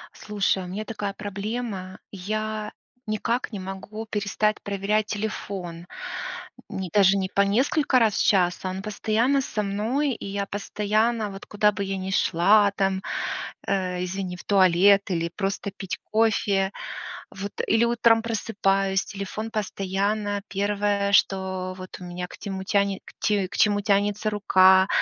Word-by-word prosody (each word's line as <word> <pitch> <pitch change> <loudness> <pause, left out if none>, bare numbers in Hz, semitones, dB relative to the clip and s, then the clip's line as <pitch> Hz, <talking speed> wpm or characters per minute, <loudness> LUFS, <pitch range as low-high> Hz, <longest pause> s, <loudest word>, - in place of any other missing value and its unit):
Слушай, 200 -2 0
у - - -7
меня 205 +4 -4
такая 210 -3 -4
проблема: 205 -1 -4
я 215 +2 -3 0.4
никак 230 +4 -1
не 205 - -5
могу 195 +4 -6
перестать 210 0 0
проверять 205 +2 0
телефон. 195 -5 -4 0.8
Не 190 -2 -4
даже 200 -1 +5
не 190 -1 -1
по 200 - +2
несколько 260 - +3
раз 220 -3 +3
в - - +2
час, 180 -3 +3
а 185 - -1
он 190 +1 -4
постоянно 225 +6 +1
со 215 -5 -2
мной, 225 +9 0
и 220 - -7
я 200 0 -2
постоянно, 210 +2 0
вот 195 0 -9
куда 210 0 +3
бы 200 -1 -3
я 195 0 -2
ни 190 0 -4
шла 200 +3 +4
там, 195 -1 +1 0.7
э 180 -2 0
извини, 180 0 -4
в - - -11
туалет 195 +1 +5
или 170 -1 0
просто 195 0 -2
пить 190 - -5
кофе, 210 -3 +2 0.6
вот 200 +1 -6 0.2
или 225 +1 +4
утром 230 -1 +4
просыпаюсь, 195 -4 +1
телефон 205 +2 -5
постоянно 205 0 -1
1, 200 0 0
что 190 -1 +2
вот 185 0 -8
у - - -9
меня 180 0 -5
к - - -12
тему 195 -2 -5
тяне 200 0 +1 0.2
ть 200 -3 +1
к 200 - -6
чему 205 -1 +4
тянется 205 +1 +1
рука, 190 -2 +5
200 Hz, 150 wpm, -25 LUFS, 190-215 Hz, 0.8 s, даже